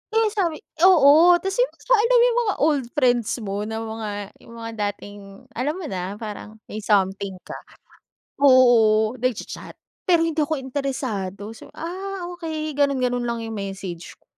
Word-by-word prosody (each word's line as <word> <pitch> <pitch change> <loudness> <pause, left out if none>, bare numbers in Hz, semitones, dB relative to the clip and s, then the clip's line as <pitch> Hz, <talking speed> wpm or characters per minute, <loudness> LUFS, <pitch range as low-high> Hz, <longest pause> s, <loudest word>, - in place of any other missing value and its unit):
eh, 445 -1 +3
sabi, 350 -7 -2 0.2
oo 335 +1 +7
ta's 385 +5 -3
yung - - +4
basta - - -13
alam 480 +3 +3
mo 480 0 +6
yung 480 - +1
mga 410 - 0
old 290 -5 +2
friends 245 -5 +2
mo 205 +1 -3
na 220 - -4
mga 220 -1 -5 0.3
yung 235 - -15
mga 230 0 -7 0.2
dating 205 0 -12 0.3
alam 275 +7 -2
mo 370 - -7
na 185 +2 -4
parang 215 0 -8 0.2
may 215 - -4
something 195 -2 0
ka. - - -8 0.8
Oo, 230 -5 +5
nagcha-chat, 255 -3 -4 0.3
pero 335 -2 +4
hindi 320 -1 -1
ako 300 +1 0
interesado 250 -7 -4
so, 225 - -13
ah, 365 +1 -5
okey 315 -3 -4
ganon, 280 -1 +1
ganon 245 -1 -1
lang 235 -1 -3
yung 225 - -6
message 195 -3 -7
ko. - - -38
255 Hz, 165 wpm, -23 LUFS, 215-325 Hz, 0.8 s, oo